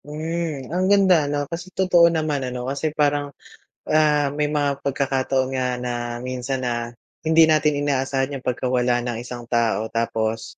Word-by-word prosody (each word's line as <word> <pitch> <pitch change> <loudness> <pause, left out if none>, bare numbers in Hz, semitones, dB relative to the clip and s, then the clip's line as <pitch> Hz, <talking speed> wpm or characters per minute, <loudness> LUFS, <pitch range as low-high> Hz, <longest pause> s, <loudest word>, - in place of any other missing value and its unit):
Hmm. 155 -1 -4
Ang 185 +1 +1
ganda, 190 -7 +4
'no, 145 0 -1
kasi 170 +4 -7
totoo 175 -2 +4
naman, 155 -4 -1
ano, 125 -1 -4
kasi 140 +4 -2
parang, 145 -1 0 0.6
ah, 150 -2 +2
may 150 0 0
mga 145 -2 -1
pagkakataon 135 -1 0
nga 130 -1 0
na 125 0 -3 0.3
minsan 130 +1 -3
na 120 -1 -2 0.3
hindi 160 +1 +5
natin 155 -2 +2
inaasahan 135 0 0
'yong 135 - -5
pagkawala 125 -1 0
ng 120 - -2
isang 120 0 -8
tao. 115 -3 +1
Tapos, 115 -1 -2
140 Hz, 155 wpm, -22 LUFS, 125-155 Hz, 0.6 s, hindi